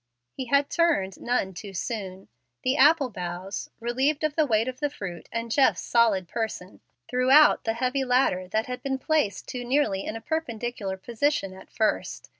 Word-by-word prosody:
He 260 - -6
had 280 +3 +2
turned 295 - +1
none 235 -6 0
too 195 +2 -9
soon. 195 -3 -5 0.4
The 255 +2 +2
apple 290 -2 +5
boughs, 180 +1 -5
relieved 260 +6 0
of 305 -1 0
the 310 -2 +2
weight 225 -1 +2
of 255 0 -5
the 290 0 0
fruit 180 - -8
and 230 0 -4
Jeff's 270 +2 +3
solid 220 -6 +2
person, 220 -4 -5 0.3
threw 250 +1 0
out 300 +3 +6
the 225 - +1
heavy 255 +3 0
ladder 250 -8 +2
that 220 +4 -1
had 250 0 -6
been 270 -1 -2
placed 265 -8 0
too 250 -1 -5
nearly 245 -7 +1
in - - -5
a 225 - -6
perpendicular 235 -9 -3
position 230 -1 -1
at 190 - -14
first. 220 -1 -1
240 Hz, 180 wpm, -26 LUFS, 195-275 Hz, 0.4 s, out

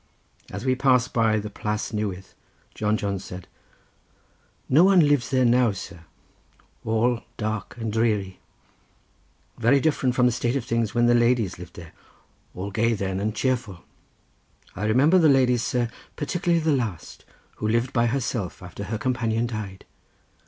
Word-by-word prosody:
As - - -6
we 130 - +3
passed 130 -1 +2
by 110 -2 +2
the 105 0 -4
Plas 105 +2 -3
Newydd 100 -4 -3 0.5
John 105 0 0
Jones 100 -2 -3
said: 90 -2 -9 1.2
"No 150 +6 +5
one 185 -5 +5
lives 145 -4 +2
there 130 -2 +2
now, 120 -2 +3
sir; 85 -3 -9 0.8
all 115 +2 +1 0.2
dark 110 -1 -4
and 115 -2 -4
dreary; 105 -5 0 1.2
very 135 +5 +4
different 135 -4 +1
from 125 - +3
the 125 - +4
state 120 +1 -1
of 130 -4 -2
things 115 -2 -1
when 120 0 +3
the 120 - +4
ladies 120 -6 +2
lived 90 -1 -11
there—all 90 +3 -12
gay 115 +3 +1
then 95 -2 -2
and 105 +2 -2
cheerful. 115 -8 -2 0.9
I 105 - -3
remember 140 +12 +4
the 160 -3 +5
ladies, 125 -3 +3
sir, 120 0 0 0.3
particularly 170 +2 0
the 160 - +2
last, 115 - -3 0.3
who 105 - -2
lived 115 +3 0
by 120 -1 +2
herself 115 -8 -3
after 90 +3 -7
her 110 +3 -3
companion 115 -1 -1
died. 105 -5 -6
115 Hz, 150 wpm, -24 LUFS, 105-125 Hz, 1.2 s, No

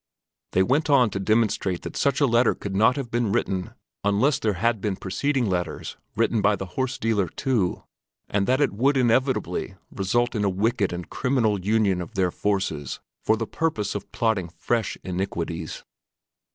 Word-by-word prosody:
They 95 - +4
went 145 +9 +1
on 125 -6 +5
to 95 - -3
demonstrate 100 -3 +1
that - - -6
such 140 -1 +1
a 145 - +5
letter 120 -1 +3
could 100 -1 -5
not 110 +5 +4
have 135 -5 -4
been 120 -3 +1
written 95 -2 -1 0.3
unless 105 +8 +2
there 110 -2 +1
had 110 +3 0
been 105 -2 -1
preceding 125 +8 -1
letters 90 -2 -3 0.2
written 115 - +2
by 105 +1 +4
the 95 - -5
horse 130 -1 -1
dealer, 110 -4 +1
too, 115 - -1 0.4
and 100 -1 0
that 130 +2 +3
it 140 -7 +2
would 135 +7 +2
inevitably 130 +2 +1 0.2
result 120 +6 0
in 105 -3 -1
a 100 - +3
wicked 105 +2 +1
and 90 0 -6
criminal 115 -7 +1
union 100 -3 +2
of 85 - -8
their 95 -2 +2
forces 95 -10 -2 0.2
for 110 - +3
the 115 - -2
purpose 130 -8 -1
of 105 - -6
plotting 110 -7 0
fresh 115 +5 -1
iniquities. 85 -3 -4
105 Hz, 175 wpm, -25 LUFS, 95-120 Hz, 0.4 s, on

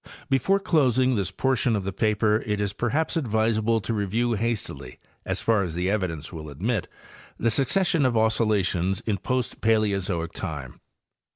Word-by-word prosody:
Before 160 +10 +3
closing 130 - +2
this 100 -5 0
portion 125 +3 +1
of 100 - -2
the 95 0 -4
paper 105 +1 +2
it 105 -1 0
1s 100 -1 -2
perhaps 140 +11 -1
advisable 110 -4 +1
to 115 - -3
review 110 +3 0
hastily, 115 +1 -3 0.3
as - - -1
far 110 -3 +2
as 85 -4 -3
the 90 +2 0
evidence 90 -6 -2
will 80 -2 -7
admit, 100 - -2 0.5
the 115 - +1
succes 140 - +2
sion 165 -6 +2
of 120 -2 0
oscillations 105 -5 +1
in 105 -4 -2
post 130 +2 -2
Paleozoic 100 -6 +1
time. 70 -6 -6
110 Hz, 160 wpm, -25 LUFS, 95-120 Hz, 0.5 s, Before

